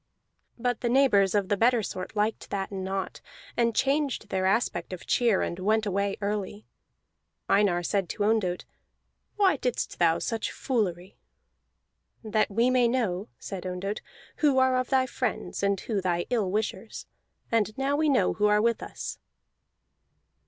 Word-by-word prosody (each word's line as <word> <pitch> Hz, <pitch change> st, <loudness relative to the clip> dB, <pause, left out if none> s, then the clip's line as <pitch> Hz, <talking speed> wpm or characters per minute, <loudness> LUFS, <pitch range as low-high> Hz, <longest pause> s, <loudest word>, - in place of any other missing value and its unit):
But 245 Hz, -1 st, -1 dB
the 240 Hz, -, 0 dB
neighbors 220 Hz, -7 st, +4 dB
of 200 Hz, -2 st, +2 dB
the 205 Hz, -, +3 dB
better 235 Hz, +2 st, +3 dB
sort 185 Hz, +2 st, -6 dB
liked 215 Hz, +1 st, -1 dB
that 195 Hz, -1 st, -3 dB
not, 190 Hz, 0 st, -4 dB, 0.3 s
and 235 Hz, -2 st, +1 dB
changed 275 Hz, -5 st, 0 dB
their 190 Hz, -1 st, 0 dB
aspect 190 Hz, -4 st, 0 dB
of 180 Hz, -, -8 dB
cheer, 230 Hz, -6 st, +2 dB
and 170 Hz, -, -4 dB
went 215 Hz, +3 st, +1 dB
away 200 Hz, 0 st, 0 dB
early. 205 Hz, 0 st, -3 dB, 0.8 s
Einar 190 Hz, -4 st, +3 dB
said 195 Hz, -1 st, 0 dB
to 205 Hz, -, -2 dB
Ondott, 205 Hz, -5 st, +1 dB, 0.7 s
"Why 385 Hz, -7 st, +3 dB
didst 250 Hz, -2 st, -2 dB
thou 170 Hz, -1 st, +4 dB
such 225 Hz, -2 st, -2 dB
foolery?" 190 Hz, -8 st, -2 dB, 1.1 s
"That 215 Hz, -1 st, +1 dB
we 230 Hz, +5 st, +2 dB
may 250 Hz, -2 st, +4 dB
know," 220 Hz, -5 st, -1 dB
said 190 Hz, -3 st, -7 dB
Ondott, 185 Hz, +3 st, -4 dB, 0.4 s
"who 290 Hz, -4 st, +3 dB
are 260 Hz, 0 st, +4 dB
of 255 Hz, -1 st, 0 dB
thy 260 Hz, -1 st, +3 dB
friends, 250 Hz, -2 st, -3 dB
and 200 Hz, -1 st, +1 dB
who 210 Hz, -4 st, -2 dB
thy 175 Hz, -2 st, 0 dB
ill 220 Hz, -6 st, +1 dB
wishers. 210 Hz, +1 st, -3 dB, 0.5 s
And 215 Hz, -2 st, +1 dB
now 275 Hz, +1 st, +1 dB
we 305 Hz, +1 st, +2 dB
know 270 Hz, -, +3 dB
who 210 Hz, 0 st, +2 dB
are 210 Hz, 0 st, +4 dB
with 230 Hz, +1 st, +1 dB
us." -, -, -6 dB
210 Hz, 155 wpm, -27 LUFS, 195-245 Hz, 1.1 s, neighbors